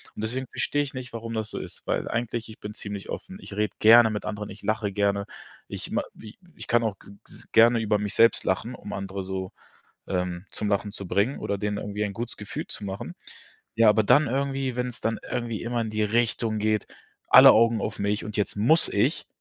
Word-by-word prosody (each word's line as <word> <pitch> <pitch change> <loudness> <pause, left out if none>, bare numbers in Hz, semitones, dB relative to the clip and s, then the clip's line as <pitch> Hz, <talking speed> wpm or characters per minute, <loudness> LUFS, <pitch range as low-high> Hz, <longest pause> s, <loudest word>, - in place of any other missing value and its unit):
Und - - -6
deswegen 125 +4 -2
verstehe 145 - 0
ich 140 - -8
nicht, 130 -2 -7
warum 115 0 -5
das 110 -1 -3
so - - -5
ist, - - -9
weil - - -1
eigentlich 115 0 -3
ich 110 - -12
bin 105 0 -7
ziemlich 100 -2 -7
offen. 190 +1 -6
Ich - - -10
rede 105 0 0
gerne 115 +1 +8
mit 105 - -4
anderen, 105 -1 -4
ich 100 - -11
lache 110 -2 -1
gerne, 100 0 0 0.4
ich - - -6
ma - - 0
wie 110 0 -13 0.2
ich - - -9
kann 120 0 +3
auch 110 -3 -2
g - - -15
gs - - -14
gerne 115 +1 +6
über 105 -1 +1
mich 105 0 -3
selbst 115 +1 +4
lachen, 115 +6 -1
um 105 - -9
andere 95 0 -4
so, 95 0 -4 0.6
ähm, 90 0 -2
zum 105 - -3
Lachen 100 0 0
zu 100 - -7
bringen 105 +10 +1
oder 100 - -2
denen 105 0 -2
irgendwie 105 0 -3
ein 100 -1 -4
gutes 120 +2 -5
Gefühl 105 - -6
zu - - -7
machen. 95 0 -5 0.6
Ja, 115 -1 +6
aber 110 +1 +3
dann 145 +7 +5
irgendwie, 135 -1 -1
wenn's 125 -2 -3
dann 115 0 0
irgendwie 115 -2 -2
immer 120 0 -1
in 110 - -4
die 110 0 0
Richtung 115 0 0
geht: 110 0 0 0.4
Alle - - +10
Augen 115 0 +4
auf 110 - -4
mich 100 +1 0
und 105 -1 -6
jetzt 105 - -1
muss 130 +11 +3
ich. 120 +10 0
110 Hz, 225 wpm, -26 LUFS, 100-115 Hz, 0.6 s, Alle